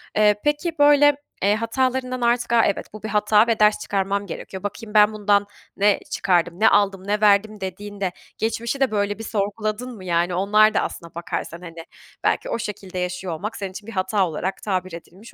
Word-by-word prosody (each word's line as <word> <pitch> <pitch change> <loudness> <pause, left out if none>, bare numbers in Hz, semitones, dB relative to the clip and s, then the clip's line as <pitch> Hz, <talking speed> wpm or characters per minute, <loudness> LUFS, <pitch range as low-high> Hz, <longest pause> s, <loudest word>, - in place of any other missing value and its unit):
Eee, 210 -1 +4
peki, 295 +3 0
böyle, 290 0 +6 0.3
eee, 205 +1 +4
hatalarından 255 +2 -1
artık 240 0 +1
a, 230 - +5
"evet, 200 - -2
bu 215 - -10
bir 220 - -4
hata 210 +1 +3
ve 230 -1 +1
ders 210 0 +4
çıkarmam 200 0 -1
gerekiyor. 190 0 -8
Bakayım 210 +2 -6
ben 210 0 +5
bundan 205 -1 +2 0.3
ne 205 0 +3
çıkardım, 175 -1 +1
ne 220 - +6
aldım, 195 -1 +1
ne 210 +1 0
verdim," 210 0 +3
dediğinde 195 0 -4 0.3
geçmişi 230 +4 -2
de 270 -4 +2
böyle 205 0 -1
bir 225 - -6
sorguladın 215 +3 -3
mı? 190 - -11
Yani, 175 0 0
onlar 210 +3 +4
da - - +2
aslına 170 -1 -6
bakarsan, 170 0 -5
hani, 165 -1 -10 0.4
belki - - 0
o - - -2
şekilde 195 -3 -6
yaşıyor 180 0 -3
olmak 210 +8 -5
senin 195 -2 -5
için 205 +3 -10
bir - - -7
hata 190 0 0
olarak 180 +4 -4
tabir 185 -3 -2
edilmiş 180 +6 -12
205 Hz, 190 wpm, -22 LUFS, 190-220 Hz, 0.4 s, böyle